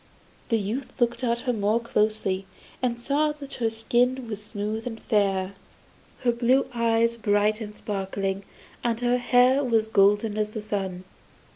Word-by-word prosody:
The 230 Hz, -, +3 dB
youth 225 Hz, +6 st, -4 dB
looked 240 Hz, +1 st, +1 dB
at 235 Hz, -1 st, +1 dB
her 250 Hz, -, 0 dB
more 215 Hz, +1 st, +1 dB
closely, 210 Hz, -4 st, 0 dB, 0.3 s
and 240 Hz, -2 st, 0 dB
saw 295 Hz, +4 st, +1 dB
that 285 Hz, -2 st, -10 dB
her 225 Hz, -, +3 dB
skin 245 Hz, +3 st, 0 dB
was 210 Hz, -2 st, -5 dB
smooth 210 Hz, +2 st, -4 dB
and 225 Hz, -2 st, -5 dB
fair, 195 Hz, -3 st, +1 dB, 0.7 s
her 245 Hz, -, +3 dB
blue 245 Hz, +3 st, +3 dB
eyes 230 Hz, 0 st, +2 dB
bright 210 Hz, 0 st, +2 dB
and 210 Hz, -1 st, -7 dB
sparkling, 195 Hz, -1 st, -3 dB, 0.4 s
and 235 Hz, -1 st, 0 dB
her 245 Hz, 0 st, +2 dB
hair 250 Hz, +3 st, +4 dB
as 220 Hz, -1 st, +3 dB
golden 205 Hz, +1 st, +3 dB
as 210 Hz, 0 st, 0 dB
the 215 Hz, 0 st, -5 dB
sun. 195 Hz, -4 st, -3 dB
225 Hz, 155 wpm, -26 LUFS, 205-240 Hz, 0.7 s, hair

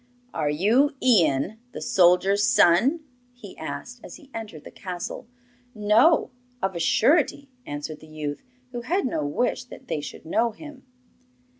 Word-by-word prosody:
'Are 150 Hz, -2 st, -1 dB
you 230 Hz, -, +2 dB
Ian, 185 Hz, -, +2 dB
the -, -, -6 dB
soldier's 195 Hz, -1 st, +3 dB
son?' 245 Hz, -, +4 dB, 0.3 s
he 230 Hz, -6 st, -12 dB
asked, 245 Hz, -1 st, -7 dB
as -, -, -10 dB
he 275 Hz, -2 st, -17 dB
entered 210 Hz, -10 st, -7 dB
the -, -, -11 dB
castle. 180 Hz, +3 st, -6 dB, 0.5 s
'No, 215 Hz, +10 st, +4 dB, 0.3 s
of 190 Hz, -3 st, -2 dB
a -, -, -3 dB
surety,' 280 Hz, -, +2 dB, 0.2 s
answered 145 Hz, +1 st, -6 dB
the 155 Hz, -, -15 dB
youth, 150 Hz, -2 st, -5 dB, 0.3 s
who 240 Hz, -1 st, -5 dB
had 345 Hz, +10 st, -1 dB
no 200 Hz, -11 st, -1 dB
wish 245 Hz, -, -1 dB
that 255 Hz, +1 st, -13 dB
they 150 Hz, -, -2 dB
should 145 Hz, -, -9 dB
know 225 Hz, +7 st, +1 dB
him. 295 Hz, 0 st, -12 dB
210 Hz, 150 wpm, -25 LUFS, 165-255 Hz, 0.5 s, son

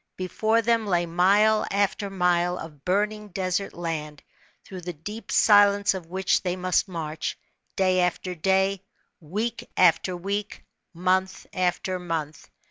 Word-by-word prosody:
Before 215 Hz, +5 st, 0 dB
them 230 Hz, -1 st, +1 dB
lay 175 Hz, -3 st, +1 dB
mile 200 Hz, +6 st, +3 dB
after 200 Hz, 0 st, 0 dB
mile 180 Hz, -1 st, +1 dB
of 150 Hz, -4 st, -10 dB
burning 210 Hz, +3 st, 0 dB
desert 185 Hz, 0 st, -2 dB
land, 155 Hz, -4 st, -5 dB, 0.4 s
through 185 Hz, -2 st, -8 dB
the 175 Hz, 0 st, -5 dB
deep 210 Hz, +9 st, -8 dB
silence 205 Hz, -1 st, +5 dB
of 185 Hz, -4 st, -7 dB
which, 190 Hz, +2 st, +1 dB
they 180 Hz, -1 st, -2 dB
must 185 Hz, +2 st, +1 dB
march, 160 Hz, -3 st, -4 dB, 0.4 s
da} 185 Hz, -1 st, +2 dB
after 180 Hz, +1 st, -1 dB
day, 190 Hz, +2 st, +1 dB, 0.4 s
week 210 Hz, +9 st, -4 dB
after 180 Hz, +1 st, +3 dB
week, 200 Hz, +3 st, -4 dB, 0.3 s
month 185 Hz, +2 st, 0 dB
after 185 Hz, 0 st, -1 dB
month. 160 Hz, -4 st, -5 dB
185 Hz, 130 wpm, -25 LUFS, 175-200 Hz, 0.4 s, silence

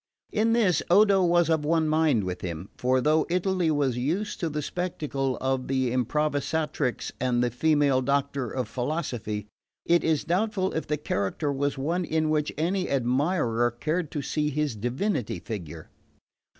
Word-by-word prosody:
In 225 Hz, +1 st, +2 dB
this 205 Hz, -9 st, +3 dB
Odo 195 Hz, +1 st, +5 dB
was 175 Hz, -1 st, +3 dB
of 160 Hz, -2 st, +1 dB
one 160 Hz, +1 st, +2 dB
mind 155 Hz, -8 st, +2 dB
with 90 Hz, -1 st, -4 dB
him; 85 Hz, +1 st, -5 dB
for 130 Hz, +1 st, +1 dB
though 155 Hz, +3 st, +2 dB
Italy 180 Hz, -1 st, +1 dB
was 140 Hz, -5 st, +1 dB
used 180 Hz, +14 st, -2 dB
to 170 Hz, -5 st, -1 dB
the 150 Hz, 0 st, -3 dB
spectacle 140 Hz, -7 st, -2 dB
of 130 Hz, -1 st, -1 dB
the 130 Hz, -2 st, 0 dB
Improvisatrice 145 Hz, +1 st, -1 dB
and 125 Hz, -1 st, +1 dB
the 120 Hz, -, 0 dB
female 145 Hz, 0 st, +2 dB
doctor 140 Hz, -1 st, 0 dB
of 125 Hz, +1 st, -3 dB
philosophy, 120 Hz, -, -3 dB, 0.4 s
it 170 Hz, 0 st, +3 dB
is 160 Hz, -3 st, +1 dB
doubtful 190 Hz, +1 st, 0 dB
if 160 Hz, -, -3 dB
the 150 Hz, -, 0 dB
character 140 Hz, +2 st, -2 dB
was 140 Hz, +1 st, -1 dB
one 165 Hz, +7 st, -1 dB
in 155 Hz, -1 st, 0 dB
which 150 Hz, -1 st, +1 dB
any 180 Hz, +4 st, 0 dB
admirer 125 Hz, -2 st, +1 dB
cared 155 Hz, +7 st, -2 dB
to 145 Hz, -2 st, -4 dB
see 150 Hz, +2 st, -1 dB
his 150 Hz, -3 st, -1 dB
divinity 125 Hz, -, -2 dB
figure. 85 Hz, -6 st, -7 dB
150 Hz, 160 wpm, -26 LUFS, 125-165 Hz, 0.4 s, Odo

